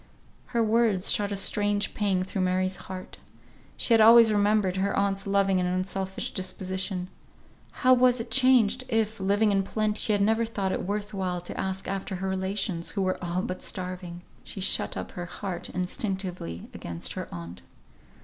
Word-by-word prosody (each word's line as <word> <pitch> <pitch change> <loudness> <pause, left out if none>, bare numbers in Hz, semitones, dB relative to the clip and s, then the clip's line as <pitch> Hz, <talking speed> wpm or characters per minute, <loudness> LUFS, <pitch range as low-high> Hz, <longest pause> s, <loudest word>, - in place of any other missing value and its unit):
Her 235 -2 +1
words 220 -4 +2
shot 205 -1 +1
a - - -1
strange 205 +1 0
pang 195 -3 +1
through 190 +1 -3
Mary's 185 +1 +1
heart. 185 -1 -8 0.6
She 235 - +3
had 225 - +6
always 230 0 +8
remembered 205 -2 +2
her 195 +1 0
aunt's 200 0 0
loving 195 -1 +2
and 180 0 0
unselfish 190 +1 -3
disposition; 185 0 -3 0.6
how 255 0 +4
was 250 0 +4
it 230 0 -6
changed, 255 -2 +4
if, 225 -2 0
living 205 +2 +2
in 195 -1 +3
plenty, 215 +2 -1
she 215 - +1
had 205 - +1
never 220 +2 +2
thought 200 -4 -2
it 185 - -3
worth 205 +1 -3
while 185 -2 -2
to 175 - -8
ask 190 0 -3
after 195 -1 -3
her 190 +1 -3
relations, 190 -2 -2
who 200 - -1
were 185 -1 -1
all 175 +1 -1
but 185 - -4
starving! 180 -2 -6 0.2
She - - -7
shut 190 - +1
up - - -5
her 175 -1 -6
heart 185 -1 -5
instinctively 185 - -3
against 85 0 -5
her - - -5
aunt. 85 +1 -8
195 Hz, 175 wpm, -27 LUFS, 185-210 Hz, 0.6 s, always